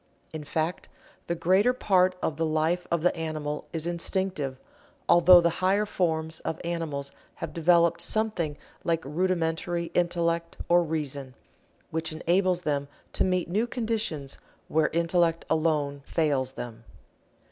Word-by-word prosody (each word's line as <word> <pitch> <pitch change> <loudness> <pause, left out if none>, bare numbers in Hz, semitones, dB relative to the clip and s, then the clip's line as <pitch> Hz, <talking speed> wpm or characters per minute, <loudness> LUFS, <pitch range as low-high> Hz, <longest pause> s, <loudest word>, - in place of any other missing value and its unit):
In 155 -1 -5
fact, 160 +4 -2 0.4
the 170 - -1
greater 190 +8 +3
part 185 -6 +3
of 150 - -1
the 165 - +1
life 160 +3 0
of 170 -2 0
the 180 - +3
animal 155 -2 -4
is 160 -1 -3
instinctive 170 -5 -1 0.5
although 175 +1 +8
the 170 0 +2
higher 195 +3 +3
forms 160 -4 -1
of 160 - -4
animals 160 -5 -3 0.2
have - - -6
developed 170 0 +3
something 175 -7 0 0.3
like 165 -3 0
rudimentary 170 +1 -1
Intellect 170 -1 0
or 175 0 +5
Reason, 145 -5 -3 0.6
which 160 0 -2
enables 180 +3 +1
them 140 -2 -1 0.3
to - - +1
meet 185 -2 0
new 210 +7 0
conditions 220 - -2 0.3
where 155 -1 +3
Intellect 170 0 +1
alone 150 -3 +1
fails 140 -5 0
them. 115 -3 -8
165 Hz, 135 wpm, -27 LUFS, 155-180 Hz, 0.6 s, although